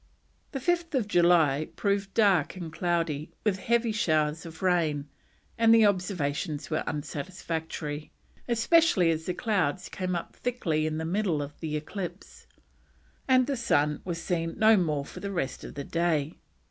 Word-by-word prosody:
July 170 -6 +3
5th - - -33
proved 200 -1 0
dark 195 -9 +3
and 170 -4 -7
cloudy, 165 -4 -1
with 200 -3 +1
heavy 235 +2 +1
showers 155 -5 0
of 160 +2 -10
rain, 160 -6 +1 0.5
and 225 -1 +5
the 225 -1 +6
observations 175 -6 -1
were 155 - 0
unsatisfactory, 155 -1 -4 0.4
especially 235 - +4
as 160 0 -3
the 180 - -1
clouds 190 -6 0
came 185 -1 -3
up 170 - -5
thickly 165 -11 -1
in 155 0 -2
the 160 - -3
middle 180 -2 0
of 145 0 -6
the 155 -2 -2
eclipse, 175 +3 -7 0.8
and 255 -1 +5
the 280 +1 -1
sun 150 - +1
was 170 -2 -4
seen 165 -1 -2
no 220 +1 +6
more 155 -7 0
for - - -10
the 200 - -4
rest 150 -9 -3
of - - -9
the 140 - -4
day. 165 -1 0
170 Hz, 150 wpm, -28 LUFS, 155-200 Hz, 0.8 s, the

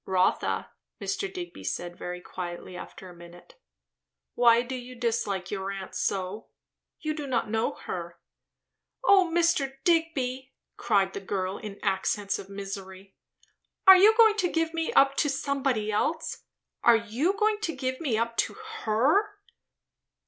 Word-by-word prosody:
"Rotha," 185 -1 0 0.3
Mr. 395 -2 -3
Digby 360 -2 -7
said 175 0 -4
very 180 0 -6
quietly 180 0 -7
after 185 - -9
a 180 - -12
minute, 175 - -15 0.7
"why 235 -1 +5
do 255 +2 -6
you 250 0 -7
dislike 225 -6 -2
your 195 -1 -3
aunt 195 -1 -6
so? 195 +2 -2 0.5
You 310 -1 -1
do 300 -2 -5
not 235 -4 -1
know 225 +1 0
her." 170 -1 -6 0.9
"O 385 -3 +5
Mr. 330 -5 +2
Digby," 275 -6 0 0.2
cried 200 -4 +1
the - - -4
girl 190 -1 -3
in 205 -2 -8
accents 195 +1 0
of 195 - -10
misery, 195 -1 -8 0.7
"are 380 - +11
you 420 +4 +6
going 440 -2 +6
to 360 -4 +1
give 325 0 0
me 325 -1 -1
up 275 0 +5
to 295 - +2
somebody 270 -6 -1
else? 315 +10 -2 0.4
Are 235 - +7
you 230 - 0
going 430 0 +2
to 335 -7 -3
give 260 +1 -3
me 260 -9 0
up 230 +1 -2
to - - 0
_her? 405 - +1
235 Hz, 150 wpm, -27 LUFS, 195-325 Hz, 0.9 s, are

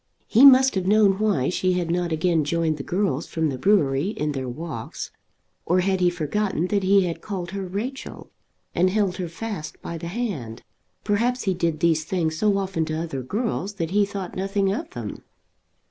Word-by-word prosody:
He 240 +5 +6
must 265 0 +7
have 190 -2 -1
known 205 -1 +4
why 205 -12 +1
she 185 0 +1
had 175 -2 -1
not 175 -1 0
again 160 0 +2
joined 160 0 0
the - - -4
girls 175 -5 -1
from 160 -1 -1
the 135 - -3
brewery 145 -4 +3
in 150 -8 -2
their 130 -3 -4
walks. 135 -3 -6 0.5
Or 180 +2 +2
had 190 0 +1
he 180 -1 +4
forgotten 175 +2 -1
that 205 -1 +1
he 195 0 +4
had 170 -2 -4
called 185 -4 -5
her 195 -1 -4
Rachel, 230 +9 -6 0.4
and 180 +2 +3
held 195 -2 0
her 180 - -3
fast 180 -2 -6
by 170 -1 -6
the 170 - -6
hand? 170 - -4 0.4
Perhaps 235 +5 +1
he 190 - +1
did 170 -3 -1
these 160 -2 +3
things 160 -2 -1
so 205 +4 +2
often 190 -4 -1
to 155 0 -3
other 160 -5 -4
girls 205 - -2
that 165 -4 -3
he 205 +1 +4
thought 195 -2 -5
nothing 195 +1 0
of 310 +9 -4
them! - - -7
185 Hz, 190 wpm, -24 LUFS, 160-205 Hz, 0.5 s, must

